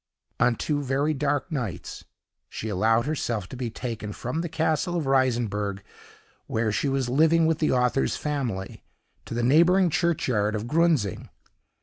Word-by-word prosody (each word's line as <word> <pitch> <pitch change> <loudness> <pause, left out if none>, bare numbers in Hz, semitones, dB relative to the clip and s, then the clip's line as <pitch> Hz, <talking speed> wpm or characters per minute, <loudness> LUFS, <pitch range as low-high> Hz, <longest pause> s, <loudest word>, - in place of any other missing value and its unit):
On 125 0 +3
two 145 +4 -1
very 140 +3 0
dark 145 +3 -1
nights 120 - -5 0.4
she 110 - -5
allowed 110 +4 +2
herself 120 -10 -2
to - - -8
be 125 -2 -3
taken 115 -3 -5
from 125 +10 -3
the 170 - -4
castle 160 +2 0
of 160 - -2
Reisenberg, 115 -7 0 0.6
where 110 -1 0
she 125 +7 0
was 135 -2 0
living 160 +5 +4
with 160 -1 +1
the 155 - +2
author's 125 +1 +1
family, 125 -11 -4 0.4
to - - -6
the 120 - -1
neighboring 170 +7 +4
churchyard 125 - +1
of 105 +1 -3
Grunzing. 155 - +1
130 Hz, 150 wpm, -25 LUFS, 115-155 Hz, 0.6 s, living